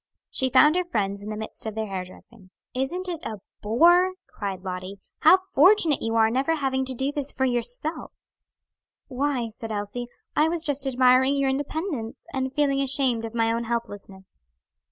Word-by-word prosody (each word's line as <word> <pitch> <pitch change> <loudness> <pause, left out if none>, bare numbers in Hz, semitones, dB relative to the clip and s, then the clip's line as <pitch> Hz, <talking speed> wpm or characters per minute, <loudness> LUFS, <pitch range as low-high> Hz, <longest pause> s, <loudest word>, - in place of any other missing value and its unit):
She 260 - +1
found 300 +5 +5
her 365 - +2
friends 200 - -2
in 205 - -7
the 215 - -4
midst 220 0 -6
of 215 - -5
their 220 0 -2
hair 190 -3 -4
dressing. 185 +2 -16 0.2
"Isn't 285 +9 -2
it 340 -2 -4
a 215 -2 -5 0.2
bore?" 345 - +4
cried 195 -3 -6
Lottie. 185 +1 -6 0.2
"How 370 +4 +6
fortunate 330 -1 +5
you 225 0 -2
are 225 -1 +5
in - - -4
never 275 +6 +1
having 265 -3 -1
to 260 0 -3
do 265 +3 -1
this 290 -1 -2
for 265 - -1
yourself." 245 +5 -2 1.0
"Why," 260 -3 -1
said 225 +1 -8
Elsie, 210 +4 -4 0.3
"I 310 +2 +3
was 335 -1 -1
just 285 -3 +1
admiring 260 +1 +4
your 275 -1 +1
independence, 285 - -4
and 265 0 -2
feeling 275 -1 +1
ashamed 260 -4 +2
of 225 +1 -8
my 225 -1 +2
own 235 0 -2
helplessness." 205 - -6
255 Hz, 180 wpm, -25 LUFS, 220-290 Hz, 1.0 s, How